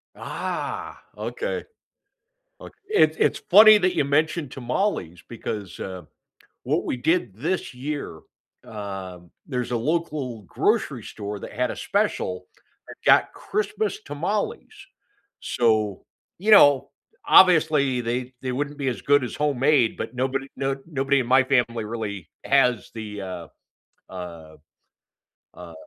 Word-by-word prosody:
Ah, -, -, -5 dB, 0.2 s
Okay. -, -, -4 dB, 1.0 s
Ok -, -, -11 dB
It's 160 Hz, -, +3 dB
it's -, -, +2 dB
funny 215 Hz, +3 st, +9 dB
that 185 Hz, -1 st, +1 dB
you 140 Hz, -, +2 dB
mentioned 155 Hz, 0 st, 0 dB
tamales 120 Hz, -, -2 dB
because, 105 Hz, -4 st, -6 dB
uh, 95 Hz, -2 st, -6 dB, 0.6 s
what -, -, 0 dB
we -, -, -2 dB
did 120 Hz, -, 0 dB
this 160 Hz, -, -2 dB
year 140 Hz, -, -5 dB, 0.4 s
um, 95 Hz, -4 st, -8 dB, 0.2 s
there's 125 Hz, -3 st, -3 dB
a 120 Hz, -, 0 dB
local 140 Hz, -4 st, -2 dB
grocery 90 Hz, -, 0 dB
store 105 Hz, 0 st, -6 dB
that -, -, -8 dB
had 125 Hz, +2 st, -1 dB
a -, -, -5 dB
special 90 Hz, 0 st, -1 dB, 0.4 s
that -, -, -9 dB
got -, -, +5 dB
Christmas 215 Hz, 0 st, -2 dB
tamales. 170 Hz, +9 st, -3 dB, 0.7 s
So, 110 Hz, -4 st, 0 dB, 0.3 s
you 205 Hz, +5 st, 0 dB
know, 145 Hz, -9 st, +7 dB, 0.4 s
obviously, 150 Hz, -8 st, +5 dB
they 125 Hz, +2 st, -3 dB
they 130 Hz, -, -2 dB
wouldn't 145 Hz, +3 st, -3 dB
be 135 Hz, -, -1 dB
as 120 Hz, -6 st, -3 dB
good 145 Hz, -2 st, +3 dB
as -, -, -6 dB
homemade, 140 Hz, -4 st, +2 dB
but 115 Hz, -, -5 dB
nobody 135 Hz, +2 st, -2 dB
no 135 Hz, 0 st, -1 dB
nobody 140 Hz, -3 st, +1 dB
in 125 Hz, -, -2 dB
my 130 Hz, +2 st, +5 dB
family 120 Hz, -4 st, +1 dB
really 105 Hz, -5 st, -5 dB, 0.2 s
has 125 Hz, -3 st, +2 dB
the, 105 Hz, -3 st, -6 dB
uh, 90 Hz, -4 st, -7 dB, 0.6 s
uh, 85 Hz, -4 st, -9 dB, 1.0 s
uh, 85 Hz, -2 st, -11 dB
125 Hz, 130 wpm, -24 LUFS, 105-145 Hz, 1.0 s, funny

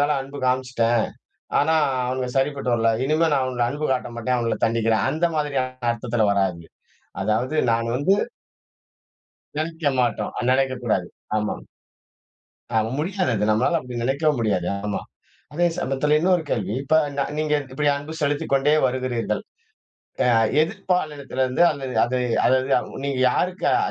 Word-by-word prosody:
மேல 145 Hz, -, +3 dB
அன்பு 140 Hz, +1 st, -9 dB
காமிச்சிட்டேன், 125 Hz, -3 st, +1 dB, 0.5 s
ஆனா 160 Hz, +3 st, +3 dB, 0.3 s
அவனுங்க 130 Hz, 0 st, -2 dB
சரிப்பட்டு 135 Hz, -2 st, 0 dB
வரல, 115 Hz, -1 st, +2 dB
இனிமே 155 Hz, +3 st, +2 dB
நான் 140 Hz, -2 st, +2 dB
அவங்கள 125 Hz, -2 st, -1 dB
அன்பு 145 Hz, +3 st, -4 dB
காட்ட 125 Hz, -, -2 dB
மாட்டேன், 125 Hz, +2 st, 0 dB
அவுங்கள 115 Hz, -1 st, 0 dB
தண்டிக்கிறேன். 115 Hz, -1 st, +1 dB
அந்த 160 Hz, +4 st, +1 dB
மாதிரியான 130 Hz, -4 st, -2 dB
அர்த்தத்துல 115 Hz, -1 st, 0 dB
வராது. 95 Hz, -4 st, 0 dB, 0.6 s
அதாவது 125 Hz, +7 st, 0 dB, 0.2 s
நான் 115 Hz, 0 st, 0 dB
வந்து 145 Hz, +9 st, +3 dB, 1.4 s
நெனைக்க 160 Hz, -1 st, -1 dB
மாட்டோம். 115 Hz, -4 st, 0 dB
ஆ -, -, -2 dB
நெனைக்கக்கூடாது. 130 Hz, -8 st, +1 dB, 0.3 s
ஆமா. 105 Hz, 0 st, -1 dB, 1.2 s
ஆமா. 110 Hz, 0 st, +2 dB
முடியாது 185 Hz, +3 st, 0 dB
அது. 105 Hz, -1 st, 0 dB
நம்மனால 125 Hz, +11 st, +2 dB
அப்பிடி 125 Hz, -1 st, -6 dB
நெனைக்கவும் 140 Hz, +3 st, +1 dB
முடியாது. 100 Hz, -6 st, 0 dB, 0.2 s
ஆமா. 105 Hz, -, -2 dB, 0.5 s
அதே 175 Hz, +4 st, +2 dB
சமயத்தில 150 Hz, -3 st, +1 dB
இன்னொரு 180 Hz, 0 st, +3 dB
கேள்வி. 105 Hz, -, -1 dB
இப்ப 160 Hz, +3 st, +3 dB, 0.2 s
ந -, -, +3 dB, 0.2 s
நீங்க 155 Hz, 0 st, 0 dB, 0.2 s
இப்பிடி 145 Hz, +2 st, +1 dB
அன்பு 145 Hz, +2 st, -7 dB
செலுத்திக்கொண்டே 145 Hz, 0 st, +2 dB
வருகிறீர்கள். 125 Hz, -2 st, -1 dB, 0.9 s
அ -, -, +3 dB, 0.3 s
எதிர்ப்பாலினத்திலிருந்து, 155 Hz, -7 st, -1 dB
அல்லது 135 Hz, -3 st, -5 dB
அது 125 Hz, +2 st, -1 dB, 0.3 s
அதாவது 130 Hz, 0 st, +1 dB
நீங்க 140 Hz, -1 st, -1 dB
யாருக்கு 180 Hz, +8 st, -1 dB
அ -, -, +4 dB
130 Hz, 135 wpm, -23 LUFS, 120-150 Hz, 1.4 s, அ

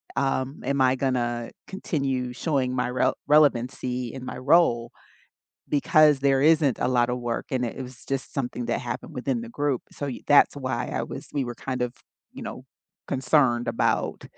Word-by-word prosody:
um, 135 Hz, 0 st, -1 dB
am 140 Hz, +1 st, 0 dB
I 130 Hz, 0 st, +4 dB
gonna 120 Hz, -3 st, -1 dB, 0.2 s
continue 135 Hz, -10 st, -2 dB
showing 130 Hz, -3 st, -1 dB
my 125 Hz, -1 st, 0 dB
rel 125 Hz, -, +1 dB
relevancy 125 Hz, -4 st, +2 dB
in 130 Hz, -, -7 dB
my -, -, -6 dB
role 130 Hz, -4 st, +3 dB, 0.8 s
because 150 Hz, 0 st, +4 dB
there 135 Hz, -1 st, +3 dB
isn't 150 Hz, -4 st, +4 dB
a -, -, +1 dB
lotta 125 Hz, -1 st, +2 dB
work 120 Hz, -1 st, -3 dB
and 125 Hz, -1 st, +1 dB
it 115 Hz, -, -4 dB
it -, -, -4 dB
was 125 Hz, -1 st, -11 dB
just 135 Hz, -1 st, -4 dB
something 125 Hz, -2 st, -3 dB
that -, -, -1 dB
happened 120 Hz, -2 st, -6 dB
within 125 Hz, -1 st, -1 dB
the 115 Hz, -, -7 dB
group, 140 Hz, +1 st, -1 dB
so 145 Hz, -, -5 dB
y 130 Hz, -, -5 dB
that's 145 Hz, 0 st, +5 dB
why 130 Hz, -3 st, -2 dB
I -, -, -2 dB
was -, -, -8 dB
we 140 Hz, -, 0 dB
were 120 Hz, -1 st, -5 dB
kind 130 Hz, 0 st, -4 dB
of, 125 Hz, 0 st, -2 dB, 0.4 s
you -, -, -9 dB
know, -, -, -7 dB, 0.4 s
concerned 130 Hz, -2 st, +2 dB
about -, -, 0 dB
130 Hz, 180 wpm, -25 LUFS, 125-140 Hz, 0.8 s, that's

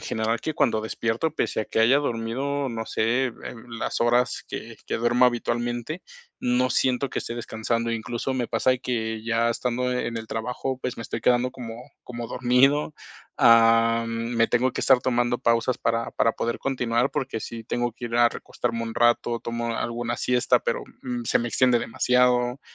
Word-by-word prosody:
general 110 Hz, +1 st, -1 dB
que 155 Hz, +6 st, -3 dB
cuando 110 Hz, -5 st, +2 dB
despierto, 115 Hz, +6 st, -1 dB
pese 135 Hz, -, -1 dB
a -, -, -2 dB
que -, -, -2 dB
haya 120 Hz, +5 st, +5 dB
dormido, 135 Hz, +2 st, -2 dB
no 115 Hz, -2 st, -4 dB
sé, 120 Hz, +4 st, +1 dB
eh, -, -, -8 dB, 0.4 s
las 115 Hz, -1 st, -4 dB
horas 120 Hz, +2 st, +2 dB
que -, -, -7 dB
que -, -, 0 dB
duermo 120 Hz, +2 st, +3 dB
habitualmente, 120 Hz, +5 st, -1 dB, 0.4 s
no 125 Hz, +1 st, +2 dB
siento 130 Hz, +1 st, +1 dB
que -, -, -2 dB
esté 115 Hz, -, -5 dB
descansando, 115 Hz, 0 st, -2 dB
incluso 120 Hz, +3 st, -3 dB
me 125 Hz, -2 st, -1 dB
pasa 130 Hz, +3 st, +2 dB
que 110 Hz, -3 st, -3 dB
ya 115 Hz, 0 st, +1 dB
estando 125 Hz, +1 st, -1 dB
en 120 Hz, -2 st, -2 dB
el 110 Hz, -, -8 dB
trabajo, 125 Hz, +4 st, -3 dB
pues, 125 Hz, -, -3 dB
me -, -, -4 dB
estoy -, -, -5 dB
quedando 125 Hz, 0 st, +2 dB
como 115 Hz, -3 st, -7 dB, 0.3 s
como 120 Hz, -1 st, -6 dB
dormido, 130 Hz, +5 st, +3 dB, 0.5 s
am, 115 Hz, 0 st, +5 dB, 0.3 s
me 115 Hz, 0 st, +4 dB
tengo 125 Hz, +2 st, +2 dB
que -, -, -3 dB
estar 130 Hz, -2 st, +5 dB
tomando 120 Hz, -1 st, +1 dB
pausas 115 Hz, 0 st, +1 dB
para 115 Hz, 0 st, -1 dB
para 115 Hz, -, +2 dB
poder 115 Hz, +1 st, -2 dB
continuar 125 Hz, -1 st, 0 dB
porque, 135 Hz, -5 st, -3 dB
sí 115 Hz, +1 st, -7 dB
tengo 120 Hz, +1 st, -1 dB
que 120 Hz, +1 st, -7 dB
ir 115 Hz, 0 st, -3 dB
a 120 Hz, 0 st, +6 dB
recostarme 115 Hz, 0 st, -4 dB
un 115 Hz, -1 st, -5 dB
rato, 120 Hz, 0 st, +2 dB
tomo 115 Hz, 0 st, -3 dB
alguna 120 Hz, 0 st, -2 dB
siesta, 125 Hz, 0 st, +2 dB
pero, -, -, -2 dB, 0.2 s
mm, 125 Hz, -1 st, -3 dB
se -, -, +2 dB
me 120 Hz, -, -2 dB
extiende 125 Hz, +1 st, +3 dB
demasiado, 125 Hz, +2 st, +2 dB
120 Hz, 180 wpm, -25 LUFS, 115-125 Hz, 0.5 s, a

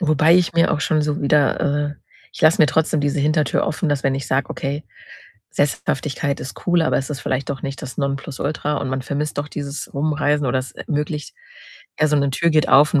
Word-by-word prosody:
Wobei 155 Hz, 0 st, +4 dB
ich 180 Hz, -2 st, +3 dB
mir 170 Hz, 0 st, +3 dB
auch 145 Hz, -, -1 dB
schon 155 Hz, 0 st, +1 dB
so 150 Hz, 0 st, -1 dB
wieder, 145 Hz, 0 st, +2 dB, 0.3 s
äh -, -, -9 dB, 0.4 s
ich -, -, -10 dB
lasse 160 Hz, +1 st, +5 dB
mir 155 Hz, -, +7 dB
trotzdem 155 Hz, +3 st, +1 dB
diese 145 Hz, 0 st, 0 dB
Hintertür 150 Hz, +1 st, +1 dB
offen, 160 Hz, +1 st, -1 dB
dass 145 Hz, -2 st, 0 dB
wenn 135 Hz, -1 st, +2 dB
ich 135 Hz, -2 st, -4 dB
sage: 135 Hz, +2 st, 0 dB
„Okay, 140 Hz, +2 st, -3 dB, 0.7 s
Sesshaftigkeit 140 Hz, 0 st, -1 dB
ist 130 Hz, -, -9 dB
cool, 175 Hz, -2 st, +3 dB
aber 160 Hz, -, +2 dB
es 135 Hz, -, -4 dB
ist 140 Hz, -2 st, -4 dB
vielleicht 130 Hz, 0 st, -2 dB
doch 135 Hz, -2 st, -5 dB
nicht 135 Hz, -1 st, -5 dB
das 135 Hz, -3 st, -7 dB
Nonplusultra 140 Hz, +1 st, -2 dB
und 140 Hz, -, -3 dB
man 130 Hz, 0 st, -2 dB
vermisst 145 Hz, +3 st, -3 dB
auch 145 Hz, -, -6 dB
dieses 145 Hz, -1 st, -6 dB
Rumreisen 150 Hz, 0 st, 0 dB
oder 130 Hz, +1 st, +1 dB
es 130 Hz, -, -6 dB
ermöglicht 150 Hz, 0 st, -4 dB, 0.6 s
ja, 155 Hz, -, +4 dB
so 150 Hz, -, +2 dB
'ne 140 Hz, -1 st, +2 dB
Tür 170 Hz, +5 st, +1 dB
geht 155 Hz, -1 st, +3 dB
auf 145 Hz, +4 st, +6 dB
und 150 Hz, -, +5 dB
145 Hz, 215 wpm, -21 LUFS, 140-155 Hz, 0.7 s, mir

